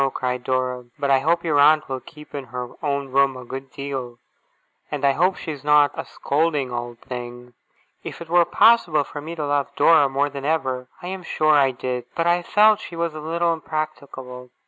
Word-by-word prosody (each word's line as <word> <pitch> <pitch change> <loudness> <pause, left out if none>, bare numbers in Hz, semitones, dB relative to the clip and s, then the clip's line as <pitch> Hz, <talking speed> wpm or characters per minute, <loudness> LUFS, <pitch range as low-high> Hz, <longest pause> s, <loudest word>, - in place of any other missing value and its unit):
cried 125 -1 -2
Dora. 130 -1 -1
'But 140 -1 0
I 135 - +5
hope 170 +5 +1
your 155 -4 +1
aunt 150 +1 +5
will 130 -1 -3
keep 150 +3 -15
in 140 -2 -5
her 125 0 -6
own 140 -2 -1
room 135 0 +2
a 125 - -9
good 135 +2 -7
deal. 130 -3 -6 0.7
And 145 -2 -2
I 140 - +5
hope 180 +7 +2
she's 150 -5 -7
not 150 -1 +5
a - - -5
scolding 145 -3 -1
old 120 0 -5
thing!' 125 0 -8 0.5
If - - -7
it 170 - -8
were 175 +1 +5
possible 175 -11 +4
for 145 +1 -8
me 165 +3 -7
to 155 -3 -3
love 145 -1 0
Dora 155 -4 +5
more 140 +2 0
than 140 -1 -7
ever, 130 -5 -1 0.2
I - - -5
am 190 0 -5
sure 155 -3 +1
I 140 -2 +5
did. 125 -1 -4
But 165 - 0
I 175 +1 +3
felt 210 +4 +4
she 170 - -9
was 165 -1 -2
a 155 - -7
little 170 +2 0
impracticable. 140 -5 -6
145 Hz, 205 wpm, -22 LUFS, 130-160 Hz, 0.7 s, I